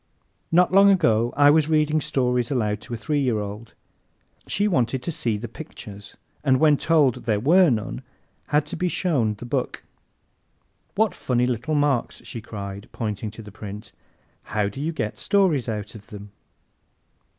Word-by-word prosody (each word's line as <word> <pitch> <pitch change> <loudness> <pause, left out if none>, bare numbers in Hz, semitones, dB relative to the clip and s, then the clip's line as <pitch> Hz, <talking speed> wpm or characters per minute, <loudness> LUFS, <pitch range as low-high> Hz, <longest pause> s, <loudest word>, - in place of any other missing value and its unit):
Not 175 +2 +4
long 195 +1 +7
ago 120 - +3
I 145 0 +7
was 155 0 +3
reading 155 0 +2
stories 125 -3 0
aloud 105 -5 -1
to 120 - -8
a - - -6
three 145 +7 -1
year 125 -5 +1
old. 105 +2 -7 0.7
She 205 +1 +1
wanted 125 - 0
to 170 - -2
"see 115 -8 -1
the 115 +3 -6
pictures," 105 -6 -10 0.3
and 130 -3 +3
when 155 -2 +5
told 150 -8 +2
there 110 -3 +1
were 170 - +5
none 110 +1 -2 0.5
had 150 0 +2
to 150 - -5
be 180 - -1
shown 140 - 0
the 115 - -9
book. 125 +1 -3 1.1
"What 215 -1 +2
funny 125 -1 0
little 125 +5 -1
marks!" 145 -4 0
she 115 - -7
cried, 100 -1 -7
pointing 110 -2 -4
to 110 +2 -10
the 105 - -11
print. 105 +1 -9 0.5
"How 105 -1 -1
do 120 +7 -7
you 160 +3 -1
get 110 -9 -4
stories 175 -12 +2
out 105 -2 -4
of 105 -2 -13
them?" 105 -1 -10
125 Hz, 170 wpm, -24 LUFS, 110-155 Hz, 1.1 s, long